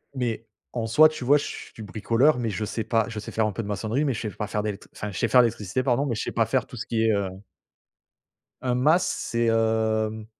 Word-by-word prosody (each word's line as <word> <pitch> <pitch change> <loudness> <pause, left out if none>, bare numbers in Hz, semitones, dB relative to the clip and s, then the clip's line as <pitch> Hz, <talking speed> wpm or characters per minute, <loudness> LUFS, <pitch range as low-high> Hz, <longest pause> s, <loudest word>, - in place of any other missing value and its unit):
Mais, 115 -3 -2 0.3
en 115 -2 -2
soit 155 +7 +7
tu 155 -5 -7
vois, 145 +3 +6
je - - -3
suis 110 - -8
bricoleur, 115 +7 +2
mais 115 -2 -1
je 105 +3 -3
sais 115 - -3
pas 115 -2 +1
je 115 - -7
sais 105 - -8
faire 110 -1 +1
un 105 - -2
peu 115 - -4
de - - -7
maçonnerie, 110 +8 -1
mais 135 - +1
je - - -4
sais 110 - -3
pas 105 - -3
faire 105 +1 -1
d'électr 105 -1 -5
enfin 105 - -5
je 95 - -7
sais - - +1
faire 125 +3 +6
l'électricité 110 0 -1
pardon, 130 +2 +1
mais 125 - -1
je - - -3
sais - - -3
pas 115 -1 +2
faire 125 +3 0
tout 130 - -11
ce 115 - -4
qui 115 -1 0
est, 110 - +4
heu 100 -2 -1 1.3
Un 125 -1 0
mas, 155 +8 +4
c'est 115 0 -1
hem 110 -1 +1
115 Hz, 260 wpm, -25 LUFS, 110-125 Hz, 1.3 s, soit